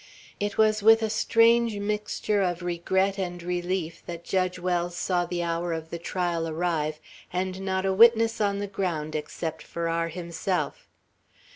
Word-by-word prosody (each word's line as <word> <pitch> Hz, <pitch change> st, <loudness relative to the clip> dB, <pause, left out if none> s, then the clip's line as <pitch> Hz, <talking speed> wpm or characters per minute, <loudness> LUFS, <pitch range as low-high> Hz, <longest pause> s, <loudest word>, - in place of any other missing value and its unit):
It 205 Hz, 0 st, -2 dB
was 215 Hz, -1 st, +4 dB
with 225 Hz, +2 st, +6 dB
a 220 Hz, -, 0 dB
strange 230 Hz, 0 st, +3 dB
mixture 210 Hz, 0 st, -1 dB
of 180 Hz, -2 st, -1 dB
regret 190 Hz, +3 st, 0 dB
and 175 Hz, -2 st, -4 dB
relief 175 Hz, -1 st, -2 dB
that 170 Hz, -1 st, -6 dB
Judge 185 Hz, 0 st, 0 dB
Wells 175 Hz, -1 st, -1 dB
saw 180 Hz, -2 st, 0 dB
the 175 Hz, -1 st, -2 dB
hour 170 Hz, 0 st, -1 dB
of 160 Hz, 0 st, -6 dB
the 170 Hz, -, -4 dB
trial 170 Hz, -1 st, -1 dB
arrive, 155 Hz, -2 st, -1 dB, 0.3 s
and 185 Hz, +1 st, -2 dB
not 190 Hz, 0 st, -1 dB
a 190 Hz, -, +2 dB
witness 225 Hz, +1 st, +5 dB
on 200 Hz, -1 st, +1 dB
the 205 Hz, -, -2 dB
ground 175 Hz, -6 st, -3 dB
except 160 Hz, +1 st, -4 dB
Farrar 165 Hz, 0 st, -2 dB
himself. 170 Hz, +2 st, -3 dB
180 Hz, 155 wpm, -26 LUFS, 170-200 Hz, 0.3 s, with